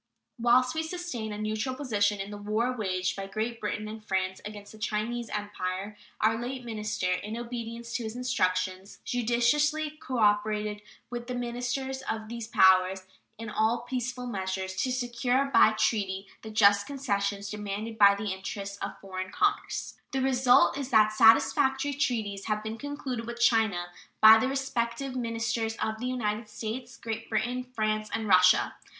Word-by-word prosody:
Whilst 250 +2 +4
we 320 - -1
sustained 320 -10 -4
a 210 - -5
neutral 215 +4 -2
position 210 -7 0
in 195 +1 -5
the 205 - -6
war 220 +5 0
waged 185 -5 -1
by 195 0 -5
Great 220 +4 -3
Britain 210 0 -3
and 215 0 -8
France 190 -2 -2
against 205 -1 -8
the 215 - -14
Chinese 220 +2 -2
Empire, 205 -1 -4 0.2
our 225 +1 +2
late 250 +1 -5
minister, 210 -4 -2
in 210 +5 -4
obedience 235 -1 -6
to 240 - -2
his 220 +1 -5
instructions, 185 -6 -1
judiciously 290 +6 +1
cooperated 210 -3 +1 0.3
with 240 0 -5
the 250 - -3
ministers 245 +2 -3
of 220 -1 -3
these 235 -1 -5
powers 190 -2 +4 0.3
in 225 0 -6
all 220 +2 +1
peaceful 250 0 -4
measures 190 -4 -3
to 255 - 0
secure 250 +1 0
by 220 - +7
treaty 195 -3 0 0.2
the 220 - -8
just 205 -2 +4
concessions 200 -7 -2
demanded 210 +2 -5
by 200 -1 +8
the 205 0 -3
interests 200 +1 -6
of - - -5
foreign 185 -1 -5
commerce. 410 - -1 0.2
The 265 - 0
result 260 +1 +4
is 275 -2 -4
that 215 -3 +5
satisfactory 265 +5 +4
treaties 220 -8 -1
have 215 -1 -1
been 220 +1 -5
concluded 270 -5 -5
with 235 0 -6
China 220 -7 +2 0.3
by 220 +1 +9
the 260 - +1
respective 265 -1 -2
ministers 230 -2 -1
of 220 0 -2
the 250 - -3
United 215 -3 -2
States, 220 +4 -6
Great 225 0 -5
Britain, 245 +3 -1
France, 215 -1 0
and 220 -1 -2
Russia. 185 -1 +5
220 Hz, 160 wpm, -28 LUFS, 205-245 Hz, 0.3 s, by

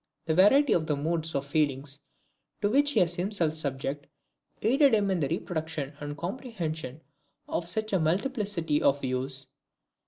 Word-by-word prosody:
The 160 - +1
variety 230 - +5
of 160 -2 +1
the 150 - +1
moods 160 +2 -2
of 140 0 -1
feeling 140 -2 0 0.8
to 205 - +3
which 285 +3 +3
he - - +4
was 175 0 +1
himself 180 -4 0
subject, 140 -2 -3 0.6
aided 265 +3 +5
him 200 -2 +1
in 185 - +1
the 145 - +1
reproduction 160 -4 -3
and 145 0 -6
comprehension 170 - -5 0.5
of 170 - -2
such 215 +3 -2
a 190 - +3
multiplicity 185 - 0
of 140 +1 +3
views. 130 +1 -1
165 Hz, 155 wpm, -28 LUFS, 145-205 Hz, 0.8 s, variety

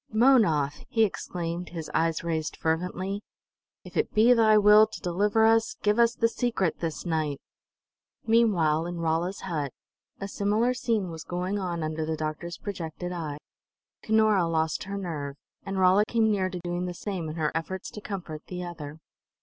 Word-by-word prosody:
"Mownoth!" 215 - +3
he 225 - +3
exclaimed, 175 -3 -3
his 165 -3 -6
eyes 165 0 +1
raised 160 -2 -2
fervently. 180 +5 -2 0.6
"If - - -13
it 445 - 0
be 225 +3 +6
thy 220 -2 +5
will 210 +1 +7
to - - -9
deliver 205 +5 +2
us, 225 0 +3
give 210 +2 +2
us 235 0 +4
the 230 - +3
secret 230 -7 -1
this 165 0 -4
night!" 155 -4 -1 0.9
Meanwhile, 175 -9 +3
in 175 0 -5
Rolla's 165 +3 -1
hut, 150 -7 -3 0.5
a 195 - -4
similar 210 +5 +1
scene 225 -7 -1
was 160 -2 -7
going 180 +3 -2
on 175 -4 -3
under 155 0 -2
the 160 0 -2
doctor's 155 +3 -4
projected 180 -3 -5
eye. 160 -5 -4 0.6
Cunora 215 -5 +3
lost 160 0 0
her 200 +1 -4
nerve, 150 -7 -4 0.3
and 195 0 -3
Rolla 190 +2 +5
came 225 -2 +2
near 190 -3 +1
to 180 - -5
doing 175 +1 -2
the 175 - -5
same 180 -5 -4
in 155 - -6
her 155 -2 0
efforts 180 +4 -4
to 210 - -8
comfort 175 -7 -6
the 180 -1 -5
other. 160 -4 -7
180 Hz, 170 wpm, -27 LUFS, 160-210 Hz, 0.9 s, will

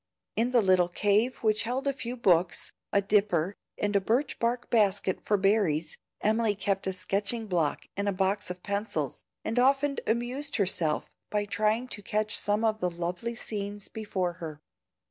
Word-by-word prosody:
In 230 +2 +2
the 245 -3 +4
little 185 -2 +4
cave 210 +7 +2
which 215 -1 +3
held 250 +4 -2
a 280 - +2
few 250 -1 -5
books, 175 -7 +2 0.2
a 200 - +3
dipper, 195 -3 +2 0.2
and 205 0 -1
a 200 - +4
birch 245 +8 0
bark 235 +1 -1
basket 205 -4 +2
for 210 - +2
berries, 190 -6 +2 0.3
Emily 220 0 +2
kept 195 -1 -1
a - - +1
sketching 200 +5 -1
block 170 -7 0
and 200 +1 0
a - - +2
box 195 +1 0
of 180 0 -6
pencils, 200 +2 -2 0.2
and 225 +2 0
often 275 +2 +3
amused 245 +6 -1
herself 175 -6 +1 0.2
by 210 -1 0
trying 215 +5 +1
to 205 - -5
catch 215 +1 0
some 210 +2 +1
of 215 -1 +1
the 180 - +1
lovely 175 +7 -3
scenes 205 -3 -4
before 190 -5 -2
her. 155 -3 -6
205 Hz, 170 wpm, -29 LUFS, 190-230 Hz, 0.3 s, the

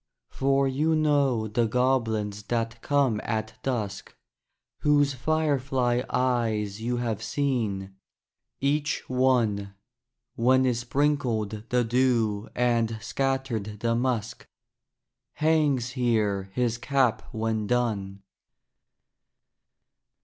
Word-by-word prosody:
For 135 0 +2
you 150 +5 +1
know 140 -7 +2
the 115 +2 +1
goblins 110 -4 0
that 115 0 -2
come 135 -7 +1
at 110 -1 -3
dusk, 110 -7 -3 0.6
Whose 145 -1 +3
firefly 135 -3 0
eyes 110 -5 0
you 120 +2 -1
have 115 -3 -2
seen, 110 -9 -2 0.6
each 145 +1 0
one, 115 -6 +1 0.6
(When 130 +2 +3
is 125 -2 +1
sprinkled 120 -5 -1
the 125 0 +2
dew 115 -3 +1
and 115 -2 +1
scattered 115 -4 -2
the 115 0 +1
musk,) 120 -2 -2 0.9
Hangs 150 -6 +2
here 105 -6 0
his 120 0 -1
cap 130 -3 +1
when 110 -1 -2
done. 100 -5 -1
120 Hz, 95 wpm, -26 LUFS, 110-135 Hz, 0.9 s, Whose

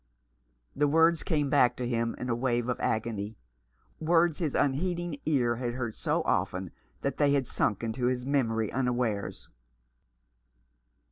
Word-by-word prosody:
The 145 +1 +3
words 165 +2 +4
came 150 -5 0
back 125 -4 +4
to 125 - -3
him 115 -1 -1
in 125 - -5
a 120 - +1
wave 120 0 0
of 125 - -1
agony, 110 -1 -2 0.6
words 165 0 +3
his 155 -6 -1
unheeding 170 +2 0
ear 120 -6 +2
had 120 -1 -3
heard 120 -3 -3
so - - -1
often 90 -1 -1 0.3
that 140 - -2
they 145 -1 +3
had 140 -2 +2
sunk 105 -2 -1
into 120 +2 -1
his 125 0 -1
memory 115 -6 0
unawares. 125 -5 -1
125 Hz, 145 wpm, -29 LUFS, 115-145 Hz, 0.6 s, words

